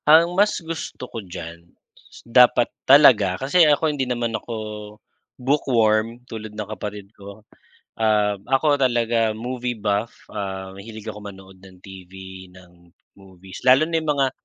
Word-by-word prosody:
Ang 165 Hz, +3 st, +6 dB
mas 205 Hz, +3 st, +2 dB
gusto 165 Hz, -6 st, -6 dB
ko 115 Hz, -2 st, -7 dB
diyan, 85 Hz, -3 st, -9 dB, 0.6 s
dapat 120 Hz, 0 st, +5 dB, 0.2 s
talaga 115 Hz, -10 st, +6 dB
kasi 140 Hz, +7 st, +2 dB
ako 150 Hz, +1 st, +2 dB
hindi 135 Hz, -3 st, -3 dB
naman 120 Hz, -2 st, -2 dB
ako 115 Hz, +1 st, -5 dB, 0.8 s
bookworm, 120 Hz, -4 st, +1 dB
tulad 110 Hz, -3 st, -8 dB
ng 105 Hz, -2 st, -5 dB
kapatid 105 Hz, 0 st, -8 dB
ko. 100 Hz, +1 st, -13 dB, 0.6 s
Um, 105 Hz, -2 st, +1 dB
ako 145 Hz, +1 st, +2 dB
talaga 115 Hz, -3 st, +1 dB
movie 125 Hz, +1 st, -4 dB
buff, 105 Hz, +1 st, -1 dB, 0.2 s
ah, 95 Hz, -1 st, -5 dB
mahilig 110 Hz, +2 st, -11 dB
ako 105 Hz, -1 st, -8 dB
manood 95 Hz, -2 st, -12 dB
ng 95 Hz, -1 st, -16 dB
TV, 95 Hz, 0 st, -11 dB
ng 90 Hz, -1 st, -19 dB, 0.3 s
movies 95 Hz, -1 st, -13 dB
lalo 130 Hz, +4 st, +6 dB
na 165 Hz, 0 st, -1 dB
yung 155 Hz, -, -4 dB
mga 135 Hz, -2 st, +1 dB
110 Hz, 140 wpm, -22 LUFS, 95-130 Hz, 0.8 s, Ang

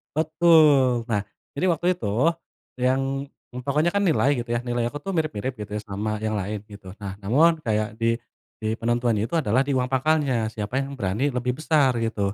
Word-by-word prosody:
Betul. 155 Hz, -6 st, +4 dB
Nah, 105 Hz, -2 st, +1 dB, 0.3 s
jadi 165 Hz, -, 0 dB
waktu 170 Hz, +2 st, -1 dB
itu, 105 Hz, -, -4 dB, 0.7 s
yang, 135 Hz, +2 st, 0 dB, 0.2 s
eee, 125 Hz, -, -6 dB
pokoknya 150 Hz, +5 st, +2 dB
kan 200 Hz, 0 st, +1 dB
nilai 145 Hz, -5 st, +3 dB
gitu 120 Hz, 0 st, -6 dB
ya, -, -, +1 dB
nilai 120 Hz, -1 st, -1 dB
aku 145 Hz, -, -5 dB
tuh 195 Hz, -, -3 dB
mirip-mirip 130 Hz, -5 st, -2 dB
gitu 105 Hz, -1 st, -7 dB
ya 105 Hz, -, -3 dB
sama 105 Hz, +1 st, -3 dB
yang 110 Hz, 0 st, -1 dB
lain 105 Hz, +1 st, -4 dB
gitu. 100 Hz, -2 st, -11 dB
Nah, 95 Hz, -1 st, -5 dB
namun 155 Hz, +11 st, +3 dB
kayak 110 Hz, -1 st, -1 dB
di 115 Hz, 0 st, +2 dB, 0.4 s
di 110 Hz, 0 st, -2 dB
penentuan 120 Hz, 0 st, 0 dB
itu 165 Hz, +10 st, -1 dB
adalah 130 Hz, -4 st, +2 dB
di 140 Hz, -, -3 dB
uang 125 Hz, -, +1 dB
pakalnya, 130 Hz, -5 st, +1 dB
siapa 110 Hz, +5 st, -3 dB
yang 140 Hz, 0 st, -6 dB
berani 110 Hz, +6 st, 0 dB
lebih 125 Hz, -1 st, -1 dB
besar 150 Hz, -5 st, +3 dB
gitu. 100 Hz, -3 st, -1 dB
125 Hz, 190 wpm, -24 LUFS, 110-145 Hz, 0.7 s, Betul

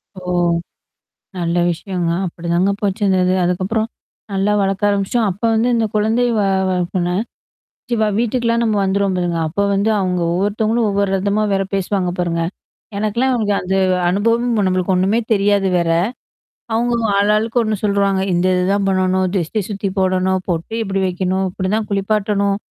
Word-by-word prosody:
ஓ! -, -, -8 dB, 1.2 s
நல்ல 170 Hz, 0 st, -1 dB
விஷயங்க. 175 Hz, 0 st, -3 dB, 0.2 s
அப்படிதாங்க 170 Hz, +3 st, 0 dB
போச்சு 200 Hz, +1 st, -1 dB
இந்த 190 Hz, -1 st, +3 dB
இது. 185 Hz, +1 st, +2 dB
அதுக்கப்புறம். 190 Hz, +5 st, -1 dB, 0.4 s
நல்லா 195 Hz, +1 st, +1 dB
வளர்க்க 195 Hz, +1 st, +1 dB
ஆரம்பிச்சுோம். 200 Hz, +3 st, +1 dB
அப்ப 190 Hz, +5 st, -12 dB
வந்து 225 Hz, +2 st, +2 dB
இந்த 230 Hz, -1 st, +1 dB
குழந்தை 220 Hz, +3 st, +2 dB
வ -, -, +3 dB, 0.3 s
வளர்ப்புனா 180 Hz, 0 st, -1 dB, 0.8 s
கண்டிப்பா 220 Hz, -2 st, +2 dB
வீட்டுக்கலாம் 235 Hz, 0 st, +1 dB
நம்ம 220 Hz, -2 st, +1 dB
வந்துருவோம் 195 Hz, 0 st, +1 dB
பாருங்க. 175 Hz, -1 st, -1 dB
அப்ப 175 Hz, +6 st, -2 dB
வந்து 200 Hz, +2 st, +1 dB
அவுங்க 180 Hz, -2 st, -1 dB
ஒவ்வொருத்தவங்களும் 215 Hz, +5 st, 0 dB
ஒவ்வொரு 200 Hz, 0 st, 0 dB
ரதமா 200 Hz, +2 st, 0 dB
வேற 195 Hz, 0 st, +1 dB
பேசுவாங்க 195 Hz, -1 st, 0 dB
பாருங்க. 170 Hz, -1 st, 0 dB, 0.6 s
எனக்கெல்லாம் 235 Hz, +5 st, 0 dB
வந்து 200 Hz, -3 st, 0 dB, 0.3 s
அனுபவம் 230 Hz, +2 st, +1 dB
நம்மளுக்கு 185 Hz, 0 st, 0 dB
ஒண்ணுமே 195 Hz, +5 st, +2 dB
தெரியாது 200 Hz, -1 st, +2 dB
வேற. 170 Hz, -1 st, 0 dB, 0.8 s
அவங்க 235 Hz, +1 st, +1 dB, 0.2 s
ஆளாளுக்கு 215 Hz, +4 st, +2 dB
ஒண்ணு 215 Hz, -1 st, 0 dB
சொல்வாங்க. 200 Hz, -2 st, +1 dB
இந்த 175 Hz, +1 st, +1 dB
இதுதான் 195 Hz, +2 st, +1 dB
பண்ணணும், 185 Hz, 0 st, +1 dB
திருஷ்டி 190 Hz, +4 st, -1 dB
சுத்தி 200 Hz, -1 st, -2 dB
போடணும், 185 Hz, 0 st, +1 dB
பொட்டு 170 Hz, +4 st, -2 dB
இப்படி 195 Hz, -2 st, -2 dB
வைக்கணும். 185 Hz, +1 st, -1 dB
இப்படிதான் 210 Hz, +4 st, -2 dB
குளிப்பாட்டணும். 200 Hz, 0 st, 0 dB
195 Hz, 140 wpm, -18 LUFS, 185-215 Hz, 1.2 s, இந்த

